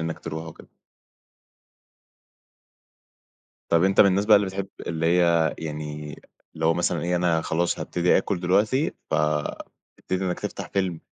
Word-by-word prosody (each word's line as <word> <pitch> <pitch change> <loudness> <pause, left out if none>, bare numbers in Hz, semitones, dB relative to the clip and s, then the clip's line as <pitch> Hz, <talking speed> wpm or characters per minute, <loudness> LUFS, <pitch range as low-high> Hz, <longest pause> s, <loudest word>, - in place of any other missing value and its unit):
إنك 80 0 -3
ترُوح 80 0 -6
وكده. 80 - -12 3.0
طَب 85 +1 +3
أنت 95 0 +4
من - - +8
الناس 100 +1 +2
بقى 105 -1 +8
اللي 100 -1 +1
بتحب 95 +1 -4 0.2
اللي 80 -1 -1
هي 85 -2 +3
يعني 75 -1 -6 0.4
لو 80 +1 +1
مثلًا - - 0
إيه 90 +1 0
أنا 85 -2 +1
خلاص 85 +2 -1
هابتدي 90 0 +1
آكل 95 -1 -2
دلوقتي، 105 - +1 0.2
فتبتدي 75 +4 -3
إنك 90 -1 -2
تفتح - - -5
فيلم 95 -4 -2
85 Hz, 135 wpm, -24 LUFS, 80-95 Hz, 3.0 s, من